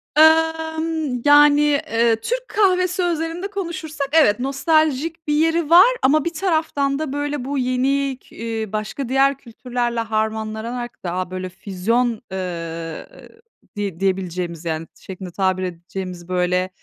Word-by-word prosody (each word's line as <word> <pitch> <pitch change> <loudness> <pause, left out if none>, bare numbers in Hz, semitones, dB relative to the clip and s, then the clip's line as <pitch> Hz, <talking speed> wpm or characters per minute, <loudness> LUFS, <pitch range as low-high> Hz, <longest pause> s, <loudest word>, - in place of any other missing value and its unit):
Imm, 320 -3 +2
yani, 290 0 +7
eee, 235 -6 +2
Türk - - -3
kahvesi 365 -3 +2
özelinde 335 +2 -2
konuşursak, 330 -7 -4
evet 290 -9 +4
nostaljik 310 +3 0
bir 295 - +1
yeri 325 +1 +2
var 360 +6 +9
ama 290 +2 +3
bir 340 - -2
taraftan 315 -5 0
da 300 -3 -3
böyle 290 -2 -3
bu 280 0 -2
yeni, 260 +1 0
k - - -20
ııı, 225 -2 -4
başka 215 +5 -3
diğer 270 +1 +3
kültürlerle 240 -1 -3
harmanlanarak 220 +2 -3
daha 180 +1 -3
böyle 185 0 -4
füzyon, 220 +6 -1
ııı, 165 -3 -5 0.7
diye 200 -4 -4
diyebileceğimiz, 180 -3 -2
yani, 160 0 -3
şeklinde 185 -1 -8
tabir 185 0 0
edeceğimiz, 180 0 -6
böyle, 180 0 +1
255 Hz, 130 wpm, -21 LUFS, 190-315 Hz, 0.7 s, var